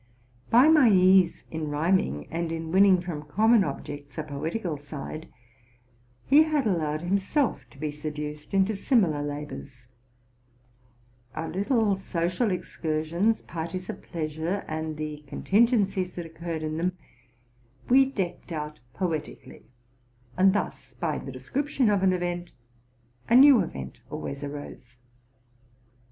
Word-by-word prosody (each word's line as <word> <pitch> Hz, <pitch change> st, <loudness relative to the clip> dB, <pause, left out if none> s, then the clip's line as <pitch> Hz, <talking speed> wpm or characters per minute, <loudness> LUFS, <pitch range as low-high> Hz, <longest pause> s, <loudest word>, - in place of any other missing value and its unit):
By 245 Hz, +5 st, +6 dB
my 305 Hz, -6 st, +6 dB
ease 185 Hz, -2 st, +5 dB
in 155 Hz, -2 st, -3 dB
rhyming, 145 Hz, -, 0 dB
and 165 Hz, 0 st, -2 dB
in 165 Hz, 0 st, -4 dB
winning 190 Hz, 0 st, +5 dB
from 170 Hz, -4 st, -5 dB
common 215 Hz, +9 st, +3 dB
objects 145 Hz, -1 st, -6 dB
a 155 Hz, -, -2 dB
poetical 160 Hz, +5 st, -3 dB
side, 145 Hz, +2 st, -8 dB, 0.9 s
he 285 Hz, +3 st, +6 dB
had 310 Hz, -4 st, +1 dB
allowed 155 Hz, -6 st, 0 dB
himself 195 Hz, -, 0 dB
to 120 Hz, -, -19 dB
be 150 Hz, +1 st, -3 dB
seduced 150 Hz, 0 st, -6 dB
into 195 Hz, +2 st, +2 dB
similar 195 Hz, -, +2 dB
labors. 145 Hz, -3 st, -7 dB, 1.5 s
Our 160 Hz, -, -3 dB
little 205 Hz, +1 st, +1 dB
social 185 Hz, +3 st, -1 dB
excursions, 170 Hz, +3 st, -1 dB
parties 170 Hz, +3 st, -5 dB
of -, -, -11 dB
pleasure, 160 Hz, +3 st, -3 dB
and 155 Hz, 0 st, -4 dB
the 150 Hz, -1 st, -5 dB
contingencies 200 Hz, -, +1 dB
that 175 Hz, -, -5 dB
occurred 165 Hz, 0 st, -5 dB
in 155 Hz, 0 st, -3 dB
them, 180 Hz, +2 st, -1 dB, 0.9 s
we 270 Hz, +2 st, +6 dB
decked 195 Hz, -9 st, -4 dB
out 150 Hz, -1 st, -5 dB, 0.2 s
poetically; 165 Hz, -5 st, -4 dB, 0.7 s
and 190 Hz, +1 st, +5 dB
thus, 205 Hz, -, -4 dB
by -, -, -2 dB
the -, -, -7 dB
description 275 Hz, -4 st, 0 dB
of 200 Hz, -2 st, +2 dB
an 190 Hz, -1 st, +4 dB
event, 175 Hz, -1 st, -3 dB, 0.8 s
anew 260 Hz, +2 st, +8 dB
event 70 Hz, -, -5 dB
always 140 Hz, +1 st, -5 dB
arose. 140 Hz, -4 st, -8 dB
170 Hz, 125 wpm, -27 LUFS, 150-200 Hz, 1.5 s, anew